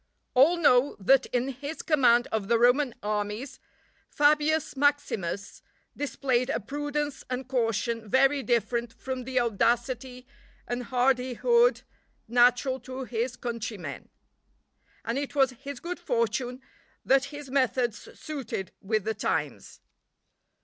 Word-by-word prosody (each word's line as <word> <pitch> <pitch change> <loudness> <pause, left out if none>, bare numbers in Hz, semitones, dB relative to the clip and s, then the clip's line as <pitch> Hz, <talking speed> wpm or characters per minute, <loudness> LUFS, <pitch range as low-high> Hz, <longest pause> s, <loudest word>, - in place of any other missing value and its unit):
All 285 +7 +5
know 280 -4 +4
that 265 +7 +4
in 250 +2 -1
his 280 +4 -6
command 245 -6 +4
of 215 -3 -1
the 235 +1 +3
Roman 245 +2 +3
armies, 210 +6 -3 0.5
Fabius 300 +1 +2
Maximus 245 -10 -1 0.3
displayed 265 -3 -1
a - - 0
prudence 290 +3 -3
and 255 0 -4
caution 230 -3 -1
very 270 +3 +4
different 235 -1 0
from 260 -1 -5
the 260 0 0
audacity 245 +3 0 0.4
and 245 0 -3
hardihood 260 - +2 0.4
natural 245 +3 +3
to 260 +1 -7
his 245 0 -3
countrymen; 230 -6 -6 1.0
and 235 +4 -1
it 285 0 -5
was 270 -2 +4
his 270 +1 -8
good 350 +4 -5
fortune 250 -3 -1 0.4
that 270 0 +4
his 285 -1 -9
methods 255 -4 0
suited 270 -10 -5
with 215 0 0
the 220 +2 -1
times. 215 - -3
255 Hz, 120 wpm, -27 LUFS, 235-275 Hz, 1.0 s, All